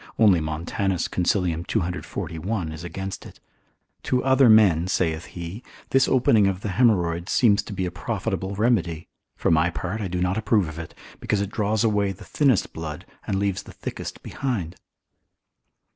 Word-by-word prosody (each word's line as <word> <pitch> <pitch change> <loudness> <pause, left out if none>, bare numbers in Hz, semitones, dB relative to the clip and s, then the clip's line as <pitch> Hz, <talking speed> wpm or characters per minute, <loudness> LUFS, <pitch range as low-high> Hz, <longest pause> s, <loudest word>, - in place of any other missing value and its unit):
Only 100 -6 +5
Montanus 85 +4 -1
consil. 90 +2 +1 0.2
241. 90 -1 -3
is 80 +1 -8
against 95 +3 -5
it; - - -13 0.6
to 125 - 0
other 130 -2 +5
men 95 -6 +5
(saith 80 -2 0
he) 85 +6 -6 0.3
this 135 0 +4
opening 115 -5 +4
of 95 -1 -2
the 105 - -3
haemorrhoids 90 -6 +2
seems 105 -4 +4
to 105 - -10
be 95 -2 -2
a 90 - -3
profitable 95 +1 -3
remedy; 95 -8 0 0.3
for - - 0
my 80 +2 +4
part 95 +5 -4
I 100 - -2
do 90 0 -3
not 90 +4 0
approve 105 -4 +2
of 80 +1 -7
it, 80 - -8 0.2
because 105 - 0
it 100 0 -3
draws 105 0 0
away 105 -3 +1
the 100 +3 -13
thinnest 135 -8 +1
blood, 75 -2 -6 0.2
and 95 - 0
leaves 100 -1 0
the - - -13
thickest - - -7
behind. 110 -12 -3
95 Hz, 165 wpm, -24 LUFS, 85-110 Hz, 0.6 s, Only